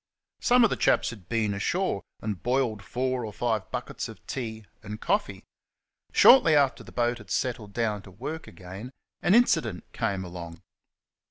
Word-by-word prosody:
Some 245 -1 +5
of 225 - +4
the - - +1
chaps - - +2
had 105 -7 -13
been 110 -3 +1
ashore 100 - -1 0.2
and 105 -6 -4
boiled 120 -2 0
four 130 +2 -2
or 110 - -5
five 110 -2 -1
buckets - - -4
of - - -13
tea 110 -4 -5 0.2
and 105 +1 -7
coffee. 205 - -1 0.7
Shortly 170 - +7
after 140 -2 +2
the - - -13
boat 120 0 0
had 105 -2 -14
settled 115 -4 -2
down 110 -3 -1
to 95 - -14
work 140 - -6
again 95 +7 -9 0.3
an 190 - +4
incident 120 - +3
came 95 -1 -1
along. 85 -2 -9
115 Hz, 165 wpm, -27 LUFS, 100-130 Hz, 0.7 s, Shortly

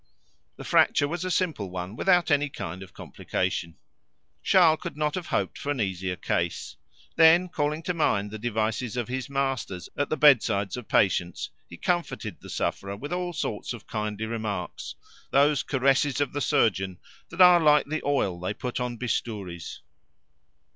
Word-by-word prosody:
The - - -9
fracture 145 - +3
was 175 +4 -4
a 185 - -2
simple 160 - -1
one, 90 +3 -6
without 175 +2 +3
any 145 0 +2
kind 90 -7 -6
of 95 -2 -10
complication. 85 -1 -3 0.6
Charles 165 -4 +5
could - - -6
not 150 -1 0
have 180 -3 -4
hoped - - -1
for 145 - -5
an 140 - -2
easier 95 -3 -2
case. - - -2 0.4
Then 165 +3 +6
calling 155 -1 -2
to 180 - -1
mind 105 -11 0
the 110 - -6
devices 110 +1 -2
of 120 - -2
his 130 +1 -4
masters 135 -9 -2
at 145 - -1
the 155 - -1
bedsides 110 -9 +4
of 125 -3 -8
patients, 90 -3 +1 0.2
he 85 - -10
comforted 175 - -2
the - - -11
sufferer 100 0 -3
with 145 +9 -6
all 180 0 -2
sorts 125 -8 -3
of 120 - -10
kindly 105 0 -3
remarks, 110 -5 -4 0.3
those 145 +1 +3
caresses 135 +1 +1
of 145 -3 -1
the 145 - -2
surgeon 95 -7 +1 0.3
that 165 - -11
are 180 -1 +8
like 150 -2 +4
the 155 +2 -3
oil 120 -11 0
they 95 +3 -3
put 125 0 -4
on 125 -1 -3
bistouries. 105 -8 -4
125 Hz, 170 wpm, -26 LUFS, 100-150 Hz, 0.6 s, are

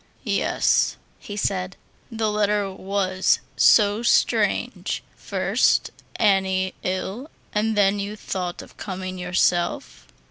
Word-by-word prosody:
"Yes," - - +1 0.2
he 205 - -8
said, 185 -2 -2 0.3
"the 220 -1 -1
letter 210 -1 +1
was 190 -1 0 0.2
so 210 0 +5
strange. 240 - +1
First, - - +1 0.2
Annie 190 -2 +2
ill, 190 +9 -3 0.2
and 215 +1 0
then 200 0 +3
you 200 +1 -4
thought 180 -4 -4
of - - -17
coming 185 -1 -5
yourself." 175 - 0
195 Hz, 105 wpm, -23 LUFS, 185-210 Hz, 0.3 s, so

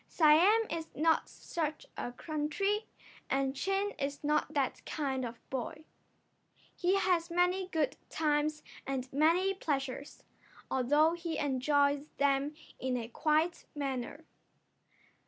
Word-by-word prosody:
Siam 350 +8 +5
is 325 -1 -3
not 320 +2 +2
such 310 -2 -4
a 245 - -4
country, 310 - -1 0.4
and 270 0 +1
Chin 390 +6 0
is 280 +1 -3
not 300 +1 +1
that 275 -3 0
kind 270 -4 -2
of 235 -1 -4
a - - -28
boy. 265 +4 -4 0.9
He 360 +2 +2
has 360 -4 +2
many 360 +2 +2
good 305 -6 0
times 300 0 0 0.2
and 265 -1 -3
many 335 +7 +3
pleasures, 280 -6 -3 0.5
although 295 +5 +4
he 335 -2 -3
enjoys 285 +1 +2
them 280 +1 +2 0.2
in 255 -1 -1
a 230 -1 -5
quiet 315 +6 +1
manner. 280 +2 -4
300 Hz, 120 wpm, -32 LUFS, 275-335 Hz, 0.9 s, Siam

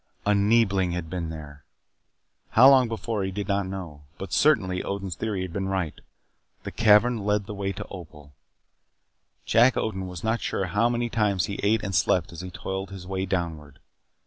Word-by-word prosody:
A 105 - +3
Neebling 100 -3 +2
had 85 -2 -5
been 85 -3 -3
there. 75 -2 -9 0.9
How 125 +4 +9
long 130 -3 +6
before 115 -2 -3
he 95 - -2
did 100 +1 -4
not 100 -2 0
know. 90 -6 -7 0.2
But, 95 -2 -7
certainly, 95 -12 +3
Odin's 100 -2 -4
theory 100 -1 -3
had 90 -3 -7
been 95 0 -2
right. 95 -5 -3 0.6
The - - -6
cavern 115 +2 +4
led 105 0 0
the 105 - -7
way 100 -1 -3
to - - -7
Opal. 75 -6 -11 1.1
Jack 120 +3 +4
Odin 95 -4 -2
was 90 -2 -8
not 110 +1 0
sure 95 - -1
how 105 +6 +1
many 120 -1 -1
times 105 -5 +1
he 100 - -5
ate 105 +1 +2
and 100 - -3
slept - - +2
as 85 - -7
he 90 - -7
toiled 95 +2 -5
his 95 -2 -9
way 95 0 -3
downward. 80 -6 -3
95 Hz, 185 wpm, -25 LUFS, 90-105 Hz, 1.1 s, How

